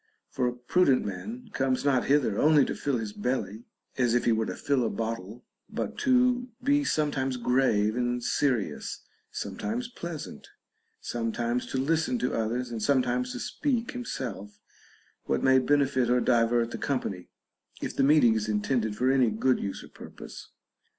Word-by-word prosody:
For 125 Hz, -2 st, 0 dB
a 120 Hz, -, -1 dB
prudent 130 Hz, +3 st, +2 dB
man 220 Hz, -, -6 dB
comes 135 Hz, 0 st, 0 dB
not 130 Hz, -4 st, +2 dB
hither 135 Hz, -7 st, +2 dB
only 150 Hz, -2 st, +5 dB
to -, -, -3 dB
fill 140 Hz, -3 st, -1 dB
his 110 Hz, -2 st, -5 dB
belly, 115 Hz, -2 st, -3 dB, 0.3 s
as 120 Hz, -2 st, +3 dB
if 120 Hz, -, +1 dB
he 120 Hz, -, +4 dB
were 110 Hz, 0 st, +1 dB
to -, -, -4 dB
fill 140 Hz, -3 st, 0 dB
a 115 Hz, -, 0 dB
bottle, 115 Hz, 0 st, -5 dB, 0.2 s
but -, -, -4 dB
to 250 Hz, -1 st, +3 dB, 0.2 s
be 285 Hz, +2 st, +3 dB
sometimes 135 Hz, -, 0 dB
grave 120 Hz, -4 st, +2 dB
and 120 Hz, 0 st, -1 dB
serious, 125 Hz, -, -1 dB, 0.3 s
sometimes 220 Hz, -, -4 dB
pleasant, 170 Hz, -9 st, -7 dB, 0.5 s
sometimes 120 Hz, +1 st, -2 dB
to -, -, -3 dB
listen 160 Hz, -, +1 dB
to 235 Hz, -, -1 dB
others, 120 Hz, +2 st, -2 dB
and 115 Hz, -2 st, -4 dB
some 130 Hz, +2 st, +3 dB
times 125 Hz, +1 st, -1 dB
to -, -, -5 dB
speak 245 Hz, -6 st, -1 dB
himself 125 Hz, -, -6 dB, 0.7 s
what -, -, 0 dB
may 130 Hz, 0 st, +5 dB
benefit 135 Hz, -2 st, +2 dB
or 125 Hz, 0 st, +4 dB
divert 120 Hz, -1 st, +2 dB
the -, -, -5 dB
com 135 Hz, -3 st, 0 dB
pany, 90 Hz, -2 st, -6 dB, 0.5 s
if -, -, -4 dB
the -, -, +1 dB
meeting 135 Hz, -5 st, +5 dB
is 110 Hz, -1 st, -2 dB
intended 110 Hz, +1 st, 0 dB
for 130 Hz, +1 st, +2 dB
any 130 Hz, -3 st, +4 dB
good 125 Hz, +4 st, +1 dB
use 100 Hz, -, -4 dB
or -, -, -11 dB
purpose. -, -, -11 dB
125 Hz, 170 wpm, -28 LUFS, 115-145 Hz, 0.7 s, only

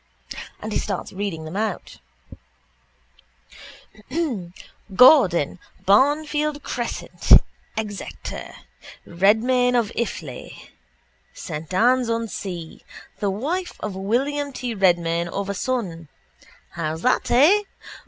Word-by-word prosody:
And 215 Hz, -, -4 dB
he -, -, 0 dB
starts 195 Hz, -3 st, -4 dB
reading 185 Hz, -5 st, -4 dB
them 160 Hz, +3 st, -7 dB
out: 215 Hz, -2 st, -3 dB, 3.0 s
—Gordon, 190 Hz, -, +6 dB, 0.3 s
Barnfield 295 Hz, +6 st, +2 dB
crescent, 240 Hz, -1 st, -5 dB, 0.5 s
Exeter; 210 Hz, -2 st, -6 dB, 0.5 s
Redmayne 235 Hz, +7 st, +3 dB
of 235 Hz, -4 st, +1 dB
Iffley, 160 Hz, -, -5 dB, 0.6 s
Saint 150 Hz, +1 st, -7 dB
Anne's 245 Hz, +5 st, +3 dB
on 230 Hz, 0 st, -1 dB
Sea: 175 Hz, -6 st, -7 dB, 0.4 s
the 205 Hz, -, 0 dB
wife 310 Hz, -, -2 dB
of 210 Hz, -3 st, -4 dB
William 275 Hz, +9 st, -1 dB
T 250 Hz, -2 st, -4 dB
Redmayne 170 Hz, -4 st, +2 dB
of 200 Hz, +3 st, -4 dB
a -, -, -1 dB
son. 190 Hz, -9 st, -3 dB, 0.6 s
How's 160 Hz, 0 st, -4 dB
that, 255 Hz, -, +2 dB
eh? 310 Hz, +12 st, +5 dB
210 Hz, 95 wpm, -23 LUFS, 180-255 Hz, 3.0 s, Gordon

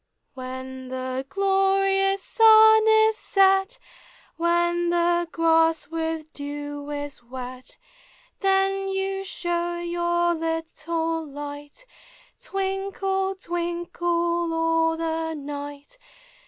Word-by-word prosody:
When 260 Hz, 0 st, -7 dB
the 260 Hz, +1 st, -4 dB
glorious 390 Hz, 0 st, +2 dB
sun 440 Hz, -1 st, +6 dB
is 440 Hz, 0 st, +5 dB
set, 390 Hz, +3 st, +3 dB, 0.6 s
When 345 Hz, +1 st, +1 dB
the 345 Hz, 0 st, +1 dB
grass 325 Hz, -1 st, +2 dB
with 320 Hz, -1 st, -4 dB
dew 290 Hz, 0 st, -6 dB
is 290 Hz, -2 st, -5 dB
wet, 255 Hz, +1 st, -9 dB, 0.6 s
Then 390 Hz, 0 st, +1 dB
you 385 Hz, 0 st, -2 dB
show 345 Hz, -2 st, -2 dB
your 345 Hz, 0 st, 0 dB
little 325 Hz, 0 st, -2 dB
light, 290 Hz, -, -9 dB, 0.6 s
Twinkle, 390 Hz, -2 st, -2 dB
twinkle, 345 Hz, -1 st, -2 dB
all 325 Hz, 0 st, +1 dB
the 325 Hz, 0 st, -2 dB
night. 290 Hz, -, -8 dB
340 Hz, 85 wpm, -24 LUFS, 295-385 Hz, 0.6 s, sun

